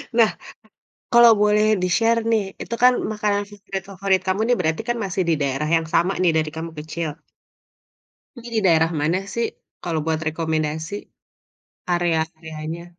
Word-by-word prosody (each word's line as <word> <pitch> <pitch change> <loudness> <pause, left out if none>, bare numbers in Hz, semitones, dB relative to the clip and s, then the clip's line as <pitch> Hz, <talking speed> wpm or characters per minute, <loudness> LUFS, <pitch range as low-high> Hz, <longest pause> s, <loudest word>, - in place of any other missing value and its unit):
Nah, 230 -2 +5 0.8
kalau 235 -1 +8
boleh 210 0 +4 0.2
di-share 225 +6 +2
nih 220 -2 +3 0.2
itu - - -5
kan 250 0 +8 0.2
makanan 210 -1 0
favorit 200 -1 -6
favorit 190 0 +1
kamu 190 +2 0
nih 245 - +4
berarti 160 -2 0
kan 240 - +1
masih 190 0 -1
di 165 - +4
daerah 140 +2 -1
yang 165 0 -1
sama 180 +3 +3
nih 175 -2 +4
dari 155 -1 -1
kamu 165 +1 -5
kecil. 160 +1 -4 1.3
Ini 240 -1 -10
di - - +3
daerah 165 -2 +4
mana 165 +5 +1
sih 235 -1 0 0.4
kalau 165 -2 -1
buat 160 -1 0
rekomendasi? 160 +1 -2 1.0
Area-areanya. 160 -1 -2
175 Hz, 150 wpm, -22 LUFS, 160-210 Hz, 1.3 s, kalau